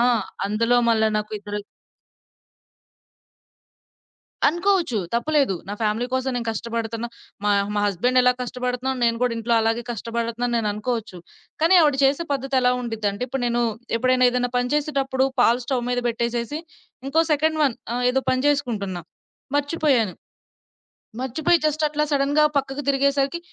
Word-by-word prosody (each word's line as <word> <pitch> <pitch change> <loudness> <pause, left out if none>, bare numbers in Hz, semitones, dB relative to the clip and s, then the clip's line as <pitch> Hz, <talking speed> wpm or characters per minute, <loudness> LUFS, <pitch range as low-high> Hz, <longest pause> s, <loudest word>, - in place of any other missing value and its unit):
ఆహ్, 240 -3 +3 0.3
అందులో 230 +4 +2
మళ్ళా 220 -1 +3
నాకు 210 0 -3
ఇద్దరు 205 0 -5 2.9
అనుకోవచ్చు 345 - +1 0.2
తప్పులేదు 275 -3 +2
నా 205 - -3
ఫ్యామిలీ 220 +3 0
కోసం 260 0 0
నేను 235 -1 -3
కష్టపడుతున్నా. 230 +1 -4 0.4
మా 210 - +3 0.2
మా 205 - +1
హస్బెండ్ 225 +7 +1
ఎలా 250 0 +5
కష్టపడుతున్నాను 250 +1 -3
నేను 230 0 +1
కూడా 250 -1 +2
ఇంట్లో 230 +1 0
అలాగే 225 +1 0
కష్టపడుతున్నాను 235 +1 -2
అని 225 - -1
నేనుకోవచ్చు. 210 -2 -3 0.4
కానీ 335 +3 +5
ఆవిడ 300 -3 +4
చేసే 280 +5 +2
పద్ధతి 270 0 -1
ఎలా 250 0 +3
ఉండీదంటే, 220 -3 -3
ఇప్పుడు 265 0 -3
నేను 240 0 0 0.4
ఎప్పుడైనా 255 +1 +3
ఏదైనా 245 0 -1
పని 245 0 +1
చేసేటప్పుడు 275 -3 0
పాలు 240 +1 +4
స్టవ్ 245 -1 -1
మీద 245 - 0
పెట్టేసేసి 235 +4 -2 0.5
ఇంకో 315 +4 +3
సెకండ్ 315 +2 +1
వన్ 265 -5 +2 0.2
ఆహ్, 245 - -1
ఏదో 265 +1 +1
పని 255 0 +1
చేసుకుంటున్నా, 215 -11 -1 0.5
మర్చిపోయాను, 285 - +1 1.1
మర్చిపోయి 310 +7 +2
జస్ట్ 305 +1 -1
అట్లా 300 0 0
సడెన్‌గా 285 +1 +3
పక్కకు 275 +1 -2
తిరిగేసరికి 280 +3 +1
250 Hz, 140 wpm, -23 LUFS, 230-275 Hz, 2.9 s, ఎలా